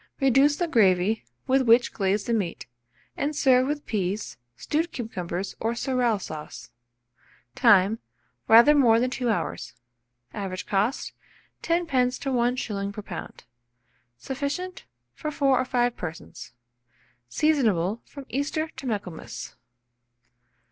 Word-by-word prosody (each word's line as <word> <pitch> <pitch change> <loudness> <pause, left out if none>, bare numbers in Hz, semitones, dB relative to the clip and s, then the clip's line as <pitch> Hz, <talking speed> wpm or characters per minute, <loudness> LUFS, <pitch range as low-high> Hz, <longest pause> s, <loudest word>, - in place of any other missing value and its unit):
Reduce 270 +2 +4
the 345 +3 -1
gravy, 205 - +2 0.2
with 265 +1 +3
which 240 0 +4
glaze 195 +1 0
the 235 - -1
meat, 200 -7 -2 0.5
and 295 +2 -2
serve 260 -2 +4
with 295 0 -3
peas, 200 0 -2 0.2
stewed 320 - -1
cucumbers, 190 -6 -4
or 230 +2 -1
sorrel 245 -3 +1
sauce. 150 -9 -8 0.8
Time. 200 - +4 0.5
Rather 235 +6 +8
more 240 -6 +5
than 250 +1 0
2 250 -2 -1
hours. 215 - -3 0.6
Average 190 -2 -5
cost, 210 +7 -1 0.5
10d. 275 -8 +1
to 275 - -3
1s. 235 -5 -1
per 210 +1 -8
lb. 175 -4 -8 0.8
Sufficient 285 - -4 0.3
for 305 - -5
4 275 -3 +2
or 255 - 0
5 245 -1 +1
persons. 160 -7 -8 0.8
Seasonable 225 - +1
from 280 -2 -11
Easter 295 +5 -2
to 265 -3 -9
Michaelmas. 195 -7 -5
240 Hz, 120 wpm, -25 LUFS, 200-275 Hz, 0.8 s, Rather